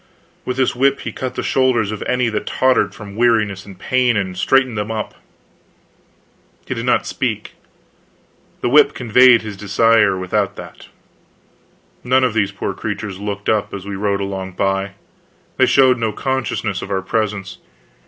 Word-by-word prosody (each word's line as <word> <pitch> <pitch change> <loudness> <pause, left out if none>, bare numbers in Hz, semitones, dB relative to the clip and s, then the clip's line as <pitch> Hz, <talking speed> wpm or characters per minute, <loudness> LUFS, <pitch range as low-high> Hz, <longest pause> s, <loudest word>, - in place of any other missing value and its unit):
With 125 0 -3
this 130 -2 +1
whip 135 +2 +2
he - - -5
cut 130 -1 -5
the - - -3
shoulders 125 -5 +1
of 110 - -6
any 125 -1 +1
that 105 -1 -4
tottered 130 0 +1
from 100 -2 -10
weariness 110 -5 +1
and 95 -2 -11
pain, 125 +2 +1
and 95 -2 -2
straightened 130 +5 +2
them 105 0 -3
up. 110 -1 -4 1.5
He - - -3
did - - -5
not - - +2
speak; - - -3 1.1
the - - 0
whip 150 +4 +5
conveyed 125 0 +5
his 105 -2 -6
desire 105 0 +3
without 100 +2 -1
that. - - -11 1.2
None 130 +1 +3
of 125 -3 +1
these 100 -3 +1
poor 100 - -4
creatures 100 -3 -5
looked 100 -1 -5
up 105 -2 0
as 95 -1 -8
we 100 0 -5
rode 100 0 -1
along 95 -1 -4
by; 95 +1 -1 0.6
they - - +4
showed 130 -2 +4
no 110 -1 0
consciousness 115 -5 -2
of - - -7
our 95 -1 -1
presence. 100 -1 -3
105 Hz, 165 wpm, -18 LUFS, 100-125 Hz, 1.5 s, whip